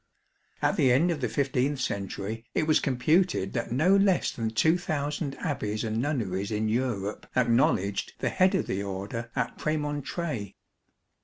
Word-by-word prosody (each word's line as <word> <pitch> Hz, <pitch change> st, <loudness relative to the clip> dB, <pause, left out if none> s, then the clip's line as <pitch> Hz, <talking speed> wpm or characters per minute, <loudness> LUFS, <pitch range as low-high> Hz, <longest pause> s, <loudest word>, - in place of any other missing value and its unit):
At -, -, +2 dB
the 130 Hz, -, +4 dB
end 160 Hz, +8 st, +4 dB
of 155 Hz, -4 st, -3 dB
the 125 Hz, -, +1 dB
15th 140 Hz, +2 st, 0 dB
century 100 Hz, -1 st, -3 dB
it 155 Hz, -, +2 dB
was 155 Hz, 0 st, +4 dB
computed 140 Hz, -, +1 dB
that -, -, -2 dB
no 160 Hz, +10 st, +4 dB
less 195 Hz, -2 st, +3 dB
than 115 Hz, -2 st, -2 dB
2,000 150 Hz, +1 st, 0 dB
Abbeys 110 Hz, -10 st, -2 dB
and 110 Hz, 0 st, -1 dB
Nunneries 100 Hz, -9 st, -1 dB
in 110 Hz, 0 st, -1 dB
Europe 110 Hz, -3 st, -2 dB
acknowledged 115 Hz, -5 st, +2 dB
the -, -, -1 dB
head 185 Hz, 0 st, +3 dB
of -, -, +1 dB
the 95 Hz, -, -2 dB
Order 100 Hz, +4 st, -5 dB
at -, -, -2 dB
Premontre". 145 Hz, -, -2 dB
125 Hz, 150 wpm, -28 LUFS, 105-150 Hz, -, the